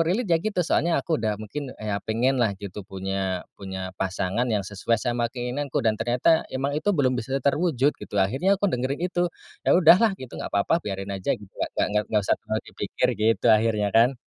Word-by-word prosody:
relate 185 +9 +1
ya 165 - +4
gitu, 185 -4 -1
soalnya 170 0 +2
aku 160 -3 -1
udah 110 -2 0
mungkin 120 +7 -6
ya 105 -2 -3
pengen 125 +4 +1
lah 100 -4 +1
gitu 100 0 -7
punya 95 -1 -3 0.2
punya 95 -1 -5
pasangan 95 +5 -1
yang 105 -3 0
sesuai 105 +3 -1
sama 120 +1 -1
keinginanku, 125 +2 -3
dan 110 -1 +1
ternyata 125 +8 +2
emang 135 +2 -2
itu 155 +8 -2
belum 130 -3 +3
bisa 125 +2 -2
terwujud 145 -2 +2
gitu. - - -11
Akhirnya 135 - +2
aku 200 - -3
dengerin 135 +7 -1
itu, 175 -1 0 0.4
ya - - +6
udahlah 190 +4 +6
gitu, 130 -2 -9
gak - - -4
apa-apa, 135 +12 +1
biarin 95 0 -5
aja 95 -1 -1
gitu, 100 -2 -15 0.2
gak 105 0 0
gak 105 -1 +2
usah - - +2
terlalu 110 0 -3
dipikir - - -1
gitu 110 +1 +2
akhirnya 110 -2 +2
kan. 120 +3 +4
120 Hz, 195 wpm, -25 LUFS, 100-145 Hz, 0.4 s, ya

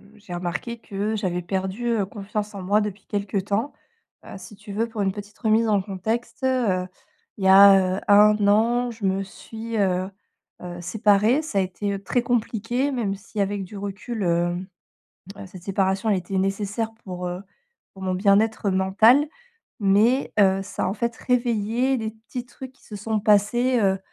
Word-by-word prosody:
j'ai 200 -4 -11
remarqué 175 +6 -4
que 210 0 -3
j'avais 180 -3 -2
perdu, 190 +6 -3
heu, 220 -4 +1
confiance 210 +1 -5
en 195 - -6
moi, 200 +3 +2
depuis 205 -1 -5
quelque 205 0 -3
temps. 205 +7 -1 0.5
Heu, - - -9
si 190 +2 -12
tu 210 +1 -11
veux, 220 +3 -1
pour 225 -2 -5
une 195 -1 +1
petite 205 +1 -10
remise 225 0 +2
en 205 -2 +2
contexte, 220 +6 -4
heu, 220 -9 +1 0.5
il 200 - -6
y - - +5
a, 190 -1 +7
heu, - - -5
1 210 0 +5
an, 235 +4 +3
je 225 -3 -6
me 190 0 +1
suis, 225 +3 -7
heu 185 -2 +1 0.5
heu, 175 -1 -7
séparée. 210 - +3
Ça 310 -10 -4
a - - +4
été, 190 +2 -3
heu, 195 - -4
très 245 +5 +1
compliqué, 240 +2 -1
même 210 -6 -1
si, 205 +1 -5
avec 200 0 -2
du 195 - -12
recul, 205 +3 -5
hem, 175 +1 0 0.8
cette 185 -1 -13
séparation 195 +1 0
a 210 - +4
été 190 +1 -2
nécessaire 205 +3 -1
pour, 180 -1 -5
heu, 180 +1 -4 0.5
pour 190 - -11
mon 185 -1 0
bien-être 200 +2 +2
mental. 215 +9 +4 0.5
Mais, 215 +7 +3
heu, 195 -1 +4
ça - - -4
a, - - +1
en 195 - -2
fait, 235 +1 -2
réveillé 240 +1 0
des 220 -1 -3
petits 230 +3 -8
trucs 260 +1 -10
qui 265 - -27
se 215 - -11
sont 215 +2 -2
passés, 230 +5 +3
heu 195 -2 +2
205 Hz, 180 wpm, -24 LUFS, 190-225 Hz, 0.8 s, a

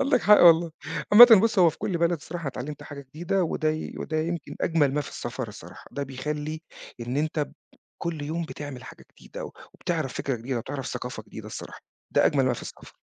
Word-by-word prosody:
عندك 275 -2 +3
حق 210 0 +7
والله. 170 -1 +7 0.4
عامةً 225 -1 +11
بُص 225 -2 +2
هو 175 -3 +7
في - - -16
كل 175 -3 -2
بلد 170 +1 +2
الصراحة 165 0 -5
اتعلمت 135 +3 -6
حاجة 145 -1 -9
جديدة، 165 +8 -2
وده 155 -1 -1
ي 155 0 -5
وده 155 - -3
يمكن 160 -2 -3
أجمل 150 -5 +2
ما 150 - +1
في 145 - -6
السفر - - -5
الصراحة. - - -12
ده 140 - -4
بيخلّي 150 +3 -4 0.4
إن 120 +3 -3
أنت 155 +2 -1
ب 145 - -3 0.5
كل 165 -3 -3
يوم 160 +4 -3
بتعمل 145 -6 -8
حاجة - - -12
جديدة، - - -8 0.3
وبتعرف - - -2
فكرة 135 -3 -2
جديدة، 120 +2 -3
وتعرف 135 +3 -5
ثقافة - - -5
جديدة - - -9
الصراحة، - - -8 0.3
ده - - +4
أجمل 135 -2 +2
ما 130 - +2
في 120 - -6
السفر. - - -11
155 Hz, 200 wpm, -26 LUFS, 140-170 Hz, 0.5 s, عامةً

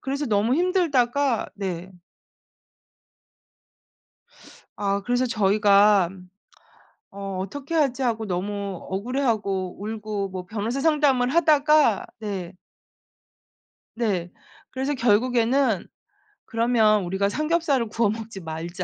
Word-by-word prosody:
그래서 280 +2 -3
너무 215 +2 +2
힘들다가 285 - +1
네. 185 -2 -5 2.9
아 200 0 -1
그래서 245 +4 0
저희가 205 -3 +4 1.0
'어 195 -1 -6
어떻게 275 - -6
하지?' 275 -4 +1
하고 225 -2 -1
너무 200 +1 -3
억울해하고 200 -4 -2
울고 210 -2 -4
뭐 185 -1 -6
변호사 225 +7 -3
상담을 285 -5 +3
하다가 300 - +4
네. 195 -5 -5 1.4
네. 195 -7 -1 0.4
그래서 270 +2 -2
결국에는 240 -1 +2 0.6
"그러면 225 -3 +2
우리가 190 +3 0
삼겹살을 305 -3 0
구워 230 -1 +1
먹지 220 -1 -6
말자. 165 +2 -5
220 Hz, 220 characters per minute, -24 LUFS, 200-265 Hz, 2.9 s, 저희가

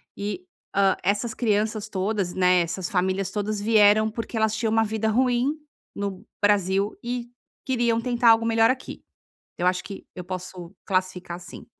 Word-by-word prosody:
e, 210 - -5 0.3
hã, 195 -1 +4
essas 205 +4 0
crianças 215 -1 0
todas, 195 -1 -1
né, 180 -1 +4
essas 175 +1 -3
famílias 190 +1 0
todas 210 0 -2
vieram, 215 0 +5
porque 230 0 -5
elas 220 0 +2
tinham 220 0 -1
uma 225 0 +3
vida 220 +1 -1
ruim 250 +4 +2 0.4
no 200 0 -4 0.2
Brasil 200 0 +2
e 240 0 -3 0.4
queriam 235 -3 +1
tentar 240 -1 +3
algo 225 0 +4
melhor 225 +1 +4
aqui. 260 - -6 0.5
Eu 175 - -1
acho 180 0 +1
que 200 - -9
eu 180 - -6
posso 180 0 -7
classificar 185 -2 -2
assim. 180 - -11
210 Hz, 160 wpm, -25 LUFS, 190-225 Hz, 0.5 s, vieram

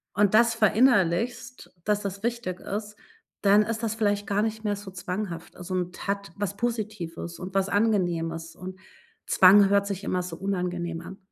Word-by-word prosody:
und 205 +1 +3
das 235 +1 +5
verinnerlichst, 230 +1 +2
dass 210 0 +1
das 195 0 -5
wichtig 235 -6 -3
ist, 210 +1 -5 0.4
dann 205 +1 +5
ist 225 +1 -3
das 225 -1 -1
vielleicht 205 -2 0
gar 205 0 +1
nicht 220 0 -2
mehr 205 -1 0
so 200 -1 -9
zwanghaft. 180 -1 -5
Also 180 +1 -6
und 180 0 -3
hat 200 -3 -3
was 200 -1 -3
Positives 210 -8 -4
und 185 +1 -7
was 195 0 +2
Angenehmes 175 -6 0
und 185 +1 -8 0.5
Zwang 195 +2 +7
hört 200 0 +3
sich 200 -1 -4
immer 180 - 0
so 175 -2 -6
unangenehm 180 -2 -3
an. 190 +3 -10
200 Hz, 170 wpm, -26 LUFS, 180-215 Hz, 0.5 s, Zwang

